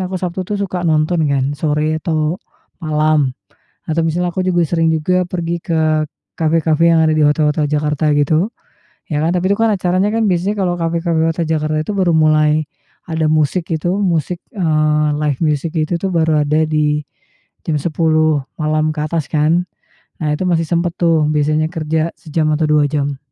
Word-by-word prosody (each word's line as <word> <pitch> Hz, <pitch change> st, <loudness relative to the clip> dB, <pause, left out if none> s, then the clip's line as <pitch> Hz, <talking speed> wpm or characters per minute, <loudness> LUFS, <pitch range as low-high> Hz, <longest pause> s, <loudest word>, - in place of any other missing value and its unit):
aku 185 Hz, -, -3 dB
Sabtu 180 Hz, 0 st, -3 dB
tuh 205 Hz, -, -1 dB
suka 190 Hz, -3 st, -3 dB
nonton 155 Hz, 0 st, +1 dB
kan 140 Hz, 0 st, 0 dB
sore 150 Hz, +1 st, -1 dB
atau 155 Hz, +2 st, -1 dB, 0.4 s
malam, 155 Hz, -2 st, +1 dB, 0.6 s
atau 160 Hz, +1 st, +1 dB
misalnya 175 Hz, +2 st, 0 dB
aku 185 Hz, +1 st, -1 dB
juga 175 Hz, -2 st, +2 dB
sering 165 Hz, -1 st, +2 dB
juga 180 Hz, +4 st, +1 dB
pergi 175 Hz, -1 st, -3 dB
ke 155 Hz, -2 st, +1 dB, 0.3 s
kafe-kafe 165 Hz, +1 st, +2 dB
yang 160 Hz, -, +4 dB
ada 155 Hz, -, +2 dB
di 150 Hz, -, +4 dB
hotel-hotel 150 Hz, 0 st, +2 dB
Jakarta 150 Hz, 0 st, 0 dB
gitu, 155 Hz, +6 st, +2 dB, 0.6 s
ya 150 Hz, -, 0 dB
kan, 165 Hz, -, +1 dB
tapi 185 Hz, +2 st, +1 dB
itu 200 Hz, -, +1 dB
kan 225 Hz, -, +3 dB
acaranya 185 Hz, +1 st, +1 dB
kan 225 Hz, -, +1 dB
biasanya 185 Hz, +4 st, 0 dB
kalau 175 Hz, -1 st, 0 dB
kafe-kafe 165 Hz, 0 st, 0 dB
hotel 165 Hz, +1 st, -1 dB
Jakarta 155 Hz, -1 st, 0 dB
itu 210 Hz, -, -4 dB
baru 185 Hz, -3 st, +2 dB
mulai 155 Hz, 0 st, +3 dB, 0.4 s
ada 160 Hz, -2 st, 0 dB
musik 155 Hz, +3 st, +1 dB
itu 175 Hz, +3 st, -1 dB
musik, 175 Hz, -2 st, 0 dB, 0.2 s
eee, 155 Hz, -4 st, +1 dB
live 150 Hz, -3 st, -1 dB
music 155 Hz, +1 st, 0 dB
itu 160 Hz, +2 st, 0 dB
tuh 195 Hz, -, -2 dB
baru 160 Hz, -2 st, +2 dB
ada 155 Hz, +2 st, +2 dB
di 150 Hz, -1 st, 0 dB, 0.6 s
jam 160 Hz, -, 0 dB
22.00 155 Hz, -2 st, +1 dB, 0.2 s
malam 155 Hz, 0 st, +1 dB
ke 150 Hz, -, -4 dB
atas 160 Hz, -2 st, -2 dB
kan. 165 Hz, +4 st, +2 dB, 0.5 s
Nah 150 Hz, -1 st, 0 dB
itu 185 Hz, -, -2 dB
masih 165 Hz, -2 st, +1 dB
sempat 170 Hz, 0 st, 0 dB
tuh 165 Hz, -3 st, +2 dB
biasanya 150 Hz, +1 st, +1 dB
kerja 160 Hz, 0 st, -1 dB
sejam 155 Hz, 0 st, -2 dB
atau 155 Hz, +1 st, +1 dB
dua 150 Hz, -1 st, +4 dB
jam. 140 Hz, -1 st, -2 dB
160 Hz, 175 wpm, -17 LUFS, 150-170 Hz, 0.6 s, yang